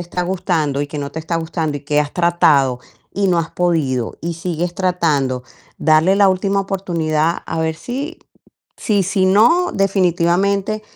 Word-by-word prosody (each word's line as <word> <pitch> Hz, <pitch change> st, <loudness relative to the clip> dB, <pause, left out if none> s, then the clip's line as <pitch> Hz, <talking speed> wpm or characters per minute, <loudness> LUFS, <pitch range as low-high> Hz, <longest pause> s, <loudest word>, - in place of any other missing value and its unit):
está 175 Hz, +1 st, -4 dB
gustando 175 Hz, -6 st, -1 dB
y 145 Hz, -, -5 dB
que 150 Hz, -, -6 dB
no 140 Hz, 0 st, -5 dB
te 160 Hz, -, -5 dB
está 165 Hz, +1 st, -3 dB
gustando 160 Hz, -2 st, -2 dB
y -, -, -7 dB
que 150 Hz, 0 st, +1 dB
has 150 Hz, 0 st, -3 dB
tratado 150 Hz, -7 st, +2 dB, 0.3 s
y 195 Hz, 0 st, +1 dB
no 175 Hz, -, +2 dB
has 165 Hz, 0 st, -2 dB
podido 150 Hz, -9 st, 0 dB
y 170 Hz, 0 st, -3 dB
sigues 175 Hz, +1 st, -3 dB
tratando, 150 Hz, -9 st, 0 dB, 0.3 s
darle 160 Hz, +5 st, +3 dB
la 200 Hz, -1 st, +5 dB
última 195 Hz, +1 st, 0 dB
oportunidad, 170 Hz, -5 st, -1 dB
a 165 Hz, -, -3 dB
ver 160 Hz, 0 st, -1 dB
si 280 Hz, -, -5 dB, 0.6 s
Sí, 205 Hz, -3 st, +1 dB
si 190 Hz, 0 st, +1 dB
no, 240 Hz, -, +4 dB
definitivamente 195 Hz, +2 st, +1 dB
175 Hz, 165 wpm, -18 LUFS, 155-195 Hz, 0.6 s, la